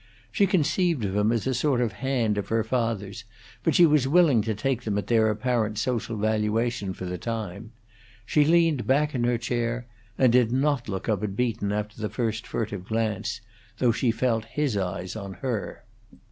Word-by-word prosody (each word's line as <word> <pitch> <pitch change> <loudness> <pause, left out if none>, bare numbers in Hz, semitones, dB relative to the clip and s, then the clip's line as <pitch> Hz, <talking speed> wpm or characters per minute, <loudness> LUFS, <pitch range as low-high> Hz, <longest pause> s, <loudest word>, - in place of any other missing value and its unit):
She 200 -3 +3
conceived 170 - +1
of 95 0 -2
him 105 +2 +2
as 115 -2 -1
a 130 - 0
sort 130 0 +1
of 120 -3 +1
hand 120 -6 0
of 100 - -4
her 115 0 +1
father's, 115 -3 -2 0.4
but 160 - +1
she 175 - +7
was 150 -4 +3
willing 150 -6 +5
to 110 0 -2
take 125 +3 -1
them 105 -4 -2
at 105 - -2
their 110 -2 +3
apparent 110 -1 0
social 115 0 -2
valuation 110 0 0
for 95 - -6
the 90 0 -4
time. 110 -1 -5 0.5
She 150 +5 +3
leaned 165 -4 +3
back 150 +3 +2
in 120 -2 0
her 120 0 +2
chair, 120 0 -2 0.3
and 125 -3 +4
did 120 -2 +4
not 135 -2 0
look 95 -2 -4
up 105 -4 0
at 100 -2 -3
Beaton 115 -4 -1
after 105 +1 -4
the 105 - -2
first 115 -3 -2
furtive 105 -5 -4
glance, 110 0 -2 0.4
though 125 0 +3
she 120 +2 0
felt 115 -1 0
his 140 0 -1
eyes 95 0 -3
on 100 -3 -6
her. 120 -7 -4
115 Hz, 190 wpm, -26 LUFS, 105-130 Hz, 0.5 s, she